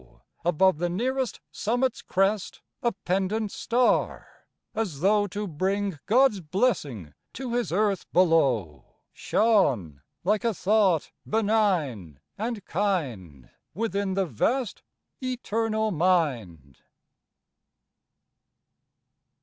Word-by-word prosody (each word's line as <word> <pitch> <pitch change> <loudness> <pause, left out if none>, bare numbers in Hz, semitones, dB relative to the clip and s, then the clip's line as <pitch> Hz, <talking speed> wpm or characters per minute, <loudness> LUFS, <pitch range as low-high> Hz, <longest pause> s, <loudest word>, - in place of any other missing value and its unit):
Above 175 0 +3
the 175 0 0
nearest 250 +5 -1
summit's 245 +4 -1
crest, 195 +1 0 0.2
A 235 - +1
pendent 195 +2 -1
star, 245 +1 0 0.3
as 190 -11 -3
though 205 +2 +3
to 205 +2 -4
bring 190 +1 -1
God's 245 -2 +4
blessing 150 - -1 0.2
to 250 -1 -5
His 245 -5 -1
Earth 200 +1 0
below, 135 - +2 0.3
Shone 130 - +1 0.2
like 210 +5 +1
a 230 -3 0
thought 195 -5 +2 0.2
benign, 180 - 0 0.2
and 220 -1 -4
kind, 125 - -2 0.2
Within 200 -2 -1
the 195 -1 +1
vast 225 - -1 0.4
Eternal 225 -3 -1
Mind. 130 - 0
195 Hz, 95 wpm, -26 LUFS, 155-220 Hz, 0.4 s, God's